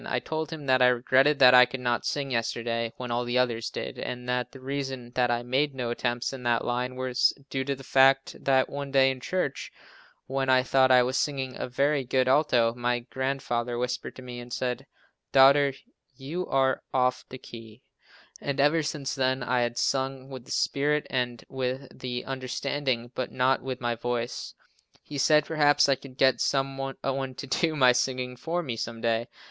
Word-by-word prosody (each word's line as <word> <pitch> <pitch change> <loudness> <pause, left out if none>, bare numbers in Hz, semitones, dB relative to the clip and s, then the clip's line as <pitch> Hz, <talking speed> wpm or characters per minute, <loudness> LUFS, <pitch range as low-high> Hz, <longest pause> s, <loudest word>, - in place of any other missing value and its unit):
I 125 - 0
told 160 +4 -4
him 155 -3 -7
that 130 -1 +3
I 125 - +7
regretted 130 +4 +3
that 125 -2 +7
I 125 0 +8
could 135 - -6
not 120 -1 -1
sing 140 -2 -2
yesterday, 115 0 -1
when 125 -1 -6
all 120 +1 0
the 120 +1 -1
others 120 -3 0
did, - - -6
and 125 0 -5
that 125 0 -1
the 135 - -12
reason 135 -2 -5
that 125 0 +1
I 120 0 0
made 135 +3 0
no 120 -2 -3
attempts 120 +1 -2
in 135 - -7
that 120 -1 0
line 125 +1 -2
was 130 -1 +2 0.2
due 135 0 -1
to 140 0 -1
the 135 - -12
fact 135 +1 +3
that 130 -1 +3
one 140 0 -6
day 135 -1 +4
in 130 - -6
church, 160 -1 -3 0.5
when 135 0 -2
I 130 -1 +5
thought 130 0 +3
I 125 -1 +6
was 130 +1 0
singing 135 -3 -2
a - - -4
very 140 +3 +1
good 130 +1 +1
alto, 130 -5 +3
my 120 0 -1
grandfather 125 -2 -3
whispered 125 +1 -3
to 130 - -11
me, 125 -1 -7
and 120 0 -10
said: 125 0 -3 0.4
"Daughter, 140 +1 +6 0.4
you 155 +8 -5
are 135 -1 +1
off 125 -1 +1
the 130 - -8
key," 115 -3 -12 0.6
and 140 0 -3
ever 145 +4 +4
since 145 -2 -3
then, 130 0 0
I 125 0 +1
had 120 0 -1
sung 135 0 -1
with 130 -2 -8
the - - -11
spirit 150 +1 +1
and 125 -2 -2
with 130 0 -5
the 125 -1 -4
understanding, 130 -1 -3
but 130 - -4
not 130 +1 +2
with 130 0 -5
my 120 -1 -1
voice. 120 +1 -4 0.5
He 145 -2 -6
said 150 +2 +4
perhaps 145 -2 +3
I 140 - +4
could 135 -1 -10
get 130 -1 +3
some 135 0 0
one 135 0 -4 0.4
to - - -7
do 155 +4 0
my 130 -4 +6
singing 125 0 -1
for 165 +7 -3
me, 125 -7 -4
some 115 0 -5
day. 115 0 0
130 Hz, 195 wpm, -27 LUFS, 125-135 Hz, 0.6 s, I